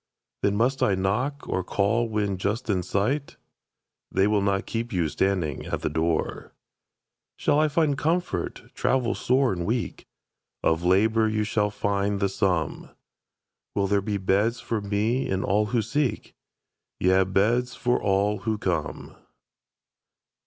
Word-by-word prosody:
Then 100 - +2
must 130 +5 +1
I 105 -7 +3
knock, 120 +10 -1
or 95 - -1
call 110 +5 +1
when 105 -3 -1
just 110 +5 -1
in 95 -2 +1
sight? 110 - -1 0.7
They 95 - +3
will 105 -1 +2
not 100 -1 0
keep 115 +1 -3
you 90 -5 +1
standing 85 -3 -1
at - - -3
that - - -2
door. 80 0 -1 0.8
Shall 145 - +2
I 155 - +4
find 150 -1 +1
comfort, 165 +5 -2
travel 130 -3 +1
sore 130 -2 +2
and 85 -2 -3
weak? 115 +6 -3 0.6
Of 80 +1 +2
labor 110 +5 +3
you 110 0 0
shall 105 -1 +1
find 100 -1 -1
the 100 -1 +1
sum. 90 -5 -1 0.9
Will 100 - +2
there 100 0 +2
be 105 +1 -2
beds 100 +5 +1
for 115 -2 -2
me 105 +6 0
and 95 0 0
all 105 +2 +2
who 115 0 0
seek? 120 0 -1 0.7
Yea, 95 +1 +4
beds 110 +6 +1
for 125 -1 0
all 100 +1 +1
who 110 -2 -1
come. 85 -6 -3
105 Hz, 145 wpm, -25 LUFS, 95-120 Hz, 0.9 s, I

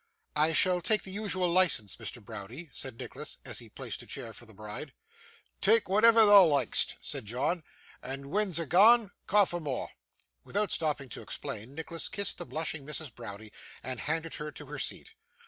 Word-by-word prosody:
'I 155 +2 +3
shall 180 +3 +4
take 215 +4 +2
the 190 - -6
usual 195 -3 0
licence, 170 - +2
Mr. 120 -4 -8
Browdie,' 115 - -8
said 130 -4 -5
Nicholas, - - -6
as - - -2
he - - -11
placed - - -6
a - - -13
chair 115 - -6
for 120 - -13
the 110 - -12
bride. 105 0 -8 0.7
'Tak' 220 +3 +4
whatever 220 +3 +6
thou 205 -2 +9
like'st,' 140 -7 +3
said - - -3
John, 145 - -1 0.4
'and 135 +2 -6
when 210 +2 +1
a's 170 - -1
gane, 210 - +5 0.2
ca' 205 0 +5
for 175 -1 -4
more.' 140 -6 -4 0.5
Without 205 0 0
stopping 145 -4 0
to - - -7
explain, 115 +5 -6
Nicholas 160 +1 -1
kissed 200 0 -1
the 175 - -6
blushing 160 -2 -3
Mrs. 150 -2 -6
Browdie, 110 -2 -10 0.3
and 130 -1 -4
handed 160 +1 -2
her 150 0 -4
to - - -9
her - - -7
seat. - - -2
160 Hz, 180 wpm, -30 LUFS, 125-190 Hz, 0.7 s, thou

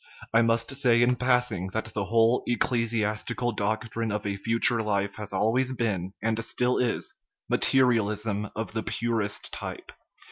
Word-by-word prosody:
I 115 - +6
must 115 +3 +1
say, 120 -4 +4
in 125 +1 +3
passing, 125 -7 +1
that 110 - -1
the 100 -2 -1
whole 115 +3 +3
ecclesiastical 115 0 0
dortrine 110 +2 -2
of 105 0 -3
a 100 -1 -1
future 115 +3 +1
life 100 -2 -1
has 105 -1 -6
al 110 +1 +1
ways 130 +1 +1
been, 100 -7 -2
and 115 0 0
still 125 +2 +1
is, 120 -2 -1 0.3
materialism 105 -5 +1
of 110 +1 -4
the 110 - -1
purest 110 -3 -2
type. - - -6
115 Hz, 150 wpm, -27 LUFS, 105-120 Hz, 0.3 s, I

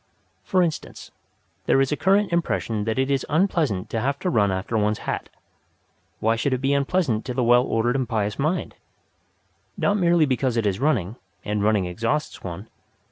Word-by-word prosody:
For 185 -1 +2
instance, 165 -3 -5 0.6
there - - +4
is 135 0 +2
a - - +2
current 195 +3 +2
impression 115 -10 -1
that 110 +1 -1
it 135 +1 +1
is 135 -2 +1
unpleasant 150 - +1
to 115 - -1
have 140 +3 0
to 180 - 0
run 100 -3 +2
after 95 +4 -3
one's 105 0 +1
hat. - - -3 0.9
Why 115 +1 +2
should 130 +3 0
it - - -1
be 135 +2 0
unpleasant 140 -5 +1
to 125 - -4
the 125 - +1
well 120 +1 +5
ordered 120 0 0
and 130 -4 -1
pious 105 -1 -1
mind? 155 +6 -1 1.0
Not 205 - +1
merely 170 -4 +4
because 130 -3 0
it 115 - +1
is 100 -1 0
running, 120 - 0 0.3
and 105 0 -1
running 105 -3 +2
exhausts 115 +12 -2
one. 95 +4 -7
125 Hz, 185 wpm, -23 LUFS, 110-150 Hz, 1.0 s, well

